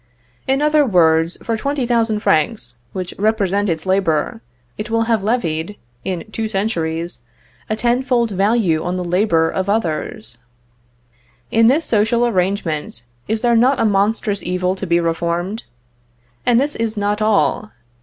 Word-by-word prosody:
In 270 +2 +1
other 300 0 +4
words, 165 - +3
for 230 - -1
20,000 235 -4 0
francs, 125 - +1 0.2
which 185 -1 -5
represent 205 -2 +1
its 160 0 -2
labor, 185 - 0 0.3
it 210 - -6
will 230 0 +1
have 225 -2 +1
levied, 195 -4 -1 0.3
in 185 -3 -3
two 220 0 -2
centuries, 170 - -2 0.5
a 215 - 0
ten 240 +3 +1
fold 240 -4 +1
value 195 -4 +1
on 180 +1 -2
the 180 - -2
labor 175 -2 +2
of 190 +1 -2
others. 155 - -2 1.1
In 225 0 +4
this 295 +7 +3
social 225 +2 +2
arrangement, 180 - -1 0.2
is 220 +1 -1
there 240 -1 +3
not 250 +4 +3
a - - +2
monstrous 205 0 +1
evil 180 +1 -1
to 190 - -4
be 170 0 +3
reformed? 170 +5 -2 0.8
And 240 -1 +5
this 290 +2 0
is 225 -1 -2
not 205 +1 -1
all. 215 0 +1
205 Hz, 145 wpm, -19 LUFS, 170-225 Hz, 1.1 s, And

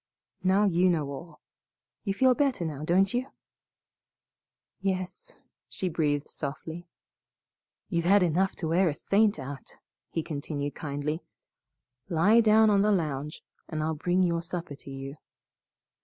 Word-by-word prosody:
Now 190 +2 +3
you 185 -2 +3
know 155 -5 +1
all. 150 +3 -9 0.6
You 195 -2 -1
feel 260 +4 +5
better 265 - 0
now, 150 -2 -4
don't 190 +4 +3
you?" 250 +2 -1 1.5
"Yes," 190 - -3 0.4
she 185 - -3
breathed 150 -3 0
softly. 160 +4 -6 1.0
"You've 170 -3 -1
had 195 +1 +5
enough 180 +3 +1
to 165 - -3
wear 175 +2 +3
a 145 - -3
saint 205 +4 +2
out," 135 0 -8 0.3
he 165 - -2
continued 145 -2 -4
kindly. 150 +2 -3 0.9
"Lie 195 +8 +5
down 220 0 +5
on 200 -1 +4
the 210 +1 +3
lounge 150 -5 -2 0.3
and 155 -1 -2
I'll 160 +1 0
bring 175 +4 +1
your 170 -2 +1
supper 170 -2 -4
to 140 - -12
you." 135 +1 -7
170 Hz, 140 wpm, -28 LUFS, 150-195 Hz, 1.5 s, feel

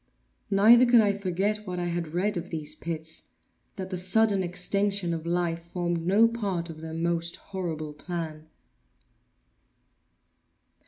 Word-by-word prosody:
Neither 225 +5 +7
could 240 -1 +7
I 205 -2 +3
forget 200 +2 -1
what 180 -1 -4
I 175 - -2
had 170 -2 -3
read 200 +4 +1
of 175 +1 -4
these 155 -2 -3
pits—that 165 +4 -8
the 185 - -2
sudden 200 +2 +3
extinction 185 +1 0
of 165 0 -5
life 170 -1 -1
formed 170 -1 -2
no 210 +5 +6
part 195 -7 -3
of 155 -1 -11
their 160 0 -6
most 170 0 -1
horrible 160 -6 -5
plan. 155 -1 -6
175 Hz, 130 wpm, -27 LUFS, 165-200 Hz, -, Neither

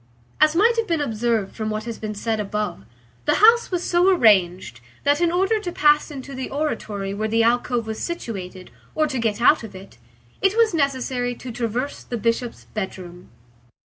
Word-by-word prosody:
As 310 +1 +4
might 460 +6 +4
have 455 -1 0
been 330 -3 0
observed 230 -6 -1
from 215 -1 -3
what 215 0 -3
has 230 0 -6
been 215 -1 -5
said 220 +1 -2
above, 210 - -3 0.4
the - - +3
house 460 +3 +5
was 360 -2 -2
so 350 +2 +3
arranged 190 - +3 0.2
that 290 +3 +2
in 340 -1 +3
order 385 +5 +1
to 360 -4 -5
pass 300 -1 +3
into 275 -1 -8
the 260 -1 -5
oratory 210 -9 -3
where 215 +2 -2
the 225 +1 +2
alcove 240 0 +1
was 220 0 -5
situated, 190 - -6 0.2
or 310 - +2
to 270 -4 -3
get 220 -2 -1
out 275 +6 +5
of 225 -4 -10
it, 190 +1 -13 0.4
it 390 +3 +2
was 455 -4 +4
necessary 260 -4 -1
to 245 +1 -8
traverse 240 +4 -3
the 240 - -5
Bishop's 230 +2 -2
bedroom. 185 -3 -6
240 Hz, 185 wpm, -22 LUFS, 215-310 Hz, 0.4 s, house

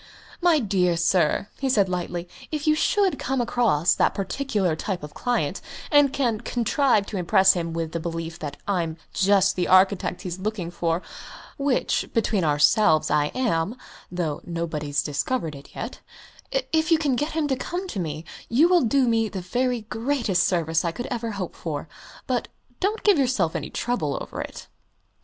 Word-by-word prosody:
"My 345 -2 +5
dear 185 - +1
sir," 175 +2 +2
he 270 - 0
said 205 -6 +3
lightly, 175 -1 -3 0.2
"if 305 -1 -3
you 310 - +5
should 385 +5 +2
come 265 0 -1
across 230 -9 +2
that - - +2
particular 195 - -1
type 180 +1 -4
of 150 0 -8
client, 245 -1 -1 0.3
and 290 -2 +5
can 245 -6 0
contrive 240 -2 +1
to 205 - -5
impress 190 +2 +5
him 170 -3 -3
with 165 -1 -3
the 170 - -3
belief 165 0 -5
that 145 -2 -6
I'm 170 -5 -1 0.2
just 195 0 +3
the 180 - 0
architect 185 -1 +3
he's 180 -1 -5
looking 195 -3 -3
out - - -13
for 170 0 0 0.6
which, 275 -2 0
between 215 -4 +1
ourselves, 155 +3 +4
I 150 -1 +3
am, 225 -4 0 0.3
though 170 -5 -2
nobody's 155 -4 -2
discovered 160 - -2
it 140 0 -13
yet - - -6 0.7
if 315 +1 +2
you 330 - +7
can 290 -5 +1
get 295 +5 -2
him 315 -2 0
to 265 - +2
come 355 +8 -4
to 200 - -4
me, 155 -2 -4 0.2
you 275 +9 +5
will 355 -1 +4
do 260 +1 +2
me 225 -1 +2
the 190 -2 -5
very 245 +6 -1
greatest 225 -4 0
service 165 -3 +1
I 170 - 0
could 240 +8 -6
ever 230 -2 -3
hope 190 -3 -5
for. 155 -2 -5 0.4
But 250 -3 -1 0.3
don't 420 +4 -1
give 405 -7 +5
yourself 245 -11 +1
any - - -3
trouble 160 - -2
over - - -6
it." - - -8
195 Hz, 175 wpm, -24 LUFS, 170-255 Hz, 0.7 s, you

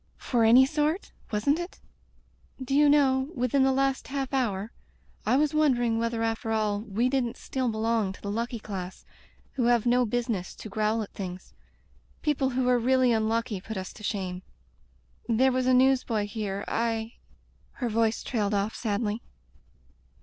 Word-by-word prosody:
"For 240 -3 0
any 240 +4 +7
sort, 305 +6 -1 0.2
wasn't 255 +9 +1
it?... 345 +1 -7 0.8
Do 260 0 -4
you 295 0 +6
know, 270 -2 +3
within 250 +2 +1
the 265 0 +4
last 270 0 0
half 270 -1 -3
hour, 220 -5 -1 0.6
I - - +4
was 295 +2 +2
won 305 -4 +4
dering 235 -2 0
whether 230 0 -1
after 225 0 -2
all 215 -2 0
we 220 +3 0
didn't 255 -3 -1
still 260 -2 -2
belong 220 -2 0
to - - -15
the 200 - -3
lucky 235 +3 -2
class 190 -4 -7 0.5
who 250 -3 -1
have 240 -1 +3
no 245 0 +3
business 230 -5 -2
to 215 - -9
growl 215 +2 0
at 205 - -11
things. 185 -1 -7 0.7
People 285 -3 +1
who 255 0 0
are 250 -1 +4
really 255 0 +3
un 220 -1 +1
lucky 225 -3 -1
put 220 +2 -6
us 185 -1 -6
to - - -14
shame.... 185 -3 -3 0.9
There 255 +4 +4
was 255 0 0
a - - +5
newsboy 255 -5 +3
here 205 -2 -4
— - - -25
I 225 0 -1 0.2
— - - -37
" - - -35
Her 250 - -3
voice 225 0 +1
trailed 210 -4 -1
off 200 +2 0
sadly. 215 0 -2
230 Hz, 180 wpm, -27 LUFS, 215-260 Hz, 0.9 s, any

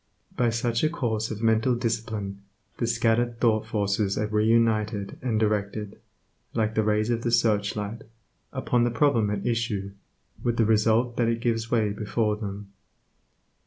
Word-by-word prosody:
By 120 -1 +2
such 115 +2 -1
a 155 - +4
course 115 -9 -2
of 110 0 -5
mental 115 +2 +3
discipline 110 -4 -3 0.4
the 115 - -1
scattered 115 0 +1
thought 110 -3 +2
forces 100 -1 0
are 105 - 0
re 105 0 +1
united, 110 -3 +1
and 115 -4 0
directed, 105 -1 -1 0.6
like 110 -1 +1
the 110 - +2
rays 105 +1 +1
of 115 -1 0
the 120 - -1
search 105 -3 +2
light, 105 +2 -4 0.5
upon 120 -1 +1
the 120 - +2
problem 115 -3 +2
at 100 -1 -3
issue, 115 -5 -1 0.5
with 120 -1 0
the 115 - +4
result 110 +2 +2
that 120 - +2
it 115 0 0
gives 115 -1 -1
way 110 -4 +2
before 105 +1 -1
them. 100 -1 -7
110 Hz, 165 wpm, -26 LUFS, 105-115 Hz, 0.6 s, a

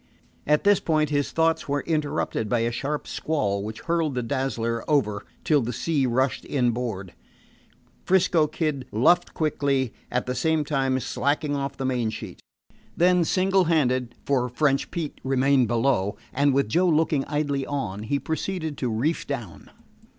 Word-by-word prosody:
At 150 +1 +3
this 205 -1 +5
point 155 -2 +1
his 145 -1 0
thoughts 160 -2 +1
were 145 0 +1
interrupted 150 -8 -1
by 120 0 +1
a 115 +1 0
sharp 145 +5 -3
squall, 105 -11 -1
which 110 +1 -6
hurled 165 -4 0
the 125 - -1
Dazzler 115 -3 -2
over 105 -9 +1 0.2
till 150 -3 +3
the 120 +1 -2
sea 140 +2 0
rushed 130 +2 0
inboard. 120 -8 -1 0.9
'Frisco 175 -4 +3
Kid 150 -5 -2
luffed 165 +11 +3
quickly, 140 -5 0 0.2
at 125 0 -1
the 125 - -2
same 160 +2 +1
time 135 -2 0
slacking 145 +4 -1
off 140 -1 -3
the 135 - -3
main 125 -3 0
sheet. - - -8 0.6
Then, 180 0 +4
single 190 +2 +2
handed, 130 -7 +1
for 125 -3 +1
French 135 +2 +1
Pete 165 -4 -5
remained 135 -1 +3
below, 115 -4 +1 0.2
and 140 +1 +3
with 135 -3 +2
Joe 175 +12 +2
looking 155 -3 +2
idly 145 -2 -1
on, 105 -9 -3
he 125 +6 -1
proceeded 160 0 -3
to 125 - -1
reef 125 +9 -1
down. 120 - -6
140 Hz, 160 wpm, -25 LUFS, 125-155 Hz, 0.9 s, this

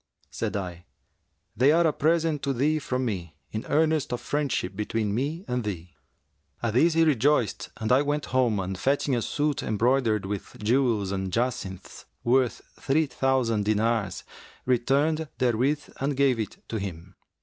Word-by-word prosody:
Said - - -2
I, 90 -3 -6 0.7
'They 130 +5 +5
are 170 +1 +4
a 155 - +3
present 160 -1 +1
to 140 -1 0
thee 150 +5 +1
from 130 -2 -2
me 90 -8 -4 0.2
in 110 - -5
earnest 155 -2 +2
of 120 - -1
friendship 140 -10 -2
between 105 0 -1
me 150 - -2
and 125 -1 -1
thee.' 90 -5 -5 0.7
At 115 -2 0
this 160 +7 +4
he 165 - +5
rejoiced 145 -5 +2
and 110 0 -2
I 130 +2 +6
went 145 0 -1
home 120 -5 +2
and 95 0 -3
fetching 135 +5 +1
a 120 - 0
suit 145 +4 -1
embroidered 110 -1 +1
with 100 0 -5
jewels 110 -3 +1
and 95 -1 -2
jacinths, 115 -5 -3 0.2
worth 125 -1 +2 0.2
three 155 +4 +2
thousand 125 -5 +1
dinars, 110 -2 0 0.4
returned 140 +6 +1
therewith 130 +4 +1
and 140 0 -1
gave 135 -4 +3
it 110 - -6
to 110 - -2
him. 95 -1 -7
125 Hz, 160 wpm, -26 LUFS, 105-145 Hz, 0.7 s, I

